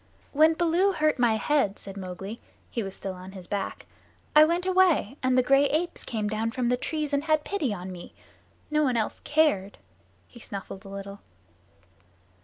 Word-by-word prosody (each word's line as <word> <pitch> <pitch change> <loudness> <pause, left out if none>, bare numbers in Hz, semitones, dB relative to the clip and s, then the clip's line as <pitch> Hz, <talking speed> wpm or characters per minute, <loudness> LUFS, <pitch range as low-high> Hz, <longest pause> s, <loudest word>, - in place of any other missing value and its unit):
"When 315 +2 +5
Baloo 350 +4 +2
hurt 305 -4 +1
my 235 -3 +4
head," 220 -2 +1
said 195 -1 -9
Mowgli 195 +3 -6 0.3
(he 235 - -2
was 195 -2 -6
still 195 -1 -5
on 185 +1 -10
his 185 -2 -9
back), 200 +2 -4 0.5
"I 305 - +10
went 340 +3 +1
away, 370 - +3
and 255 0 +2
the 255 - +5
gray 275 +2 +4
apes 325 +4 -1
came 215 -3 -2
down 215 +2 -1
from 240 0 -1
the 250 - +3
trees 300 +3 -3
and 285 +1 +1
had 310 -1 +2
pity 330 - -1
on 185 -2 -5
me. 175 -1 -10 0.6
No 305 0 +3
one 255 -5 +2
else 220 - -1
cared." 290 -11 +1 0.5
He 240 - -15
snuffled 195 -2 -8
a - - -9
little. 200 0 -7
245 Hz, 185 wpm, -27 LUFS, 200-310 Hz, 0.6 s, I